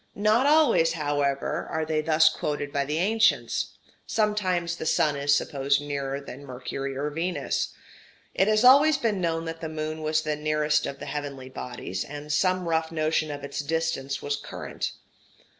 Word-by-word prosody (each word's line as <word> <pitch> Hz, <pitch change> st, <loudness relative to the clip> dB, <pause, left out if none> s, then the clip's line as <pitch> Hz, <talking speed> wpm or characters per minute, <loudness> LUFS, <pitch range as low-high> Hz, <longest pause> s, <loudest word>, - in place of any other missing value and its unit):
Not 215 Hz, +6 st, +3 dB
always, 285 Hz, -, +4 dB
however, 145 Hz, -3 st, -1 dB
are 160 Hz, 0 st, -1 dB
they 155 Hz, 0 st, 0 dB
thus 155 Hz, 0 st, +4 dB
quoted 145 Hz, -2 st, -1 dB
by 140 Hz, -1 st, +1 dB
the 150 Hz, +2 st, -2 dB
ancients: 220 Hz, +5 st, +1 dB, 0.3 s
sometimes 185 Hz, -6 st, 0 dB
the 160 Hz, -, -5 dB
sun 150 Hz, -2 st, +2 dB
is 140 Hz, 0 st, +3 dB
supposed 140 Hz, 0 st, +1 dB
nearer 140 Hz, -1 st, -3 dB
than 140 Hz, 0 st, -10 dB
Mercury 135 Hz, +1 st, -5 dB
or 145 Hz, +2 st, -2 dB
Venus. 170 Hz, +4 st, -2 dB, 0.6 s
It 190 Hz, -, +2 dB
has 215 Hz, +1 st, +3 dB
always 280 Hz, +4 st, +7 dB
been 210 Hz, -5 st, 0 dB
known 165 Hz, -1 st, -1 dB
that 165 Hz, +1 st, -6 dB
the 160 Hz, -, -4 dB
moon 155 Hz, 0 st, -4 dB
was 155 Hz, 0 st, +1 dB
the 150 Hz, -1 st, -1 dB
nearest 150 Hz, 0 st, +1 dB
of 140 Hz, -, -5 dB
the -, -, -8 dB
heavenly 140 Hz, -3 st, -5 dB
bodies; 120 Hz, -7 st, -5 dB
and 145 Hz, +1 st, -6 dB
some 185 Hz, +1 st, +1 dB
rough 160 Hz, -1 st, 0 dB
notion 155 Hz, -1 st, 0 dB
of 145 Hz, -1 st, -6 dB
its 140 Hz, 0 st, -5 dB
distance 145 Hz, -3 st, -2 dB
was 145 Hz, 0 st, -1 dB
current. -, -, -5 dB
155 Hz, 170 wpm, -26 LUFS, 145-170 Hz, 0.6 s, always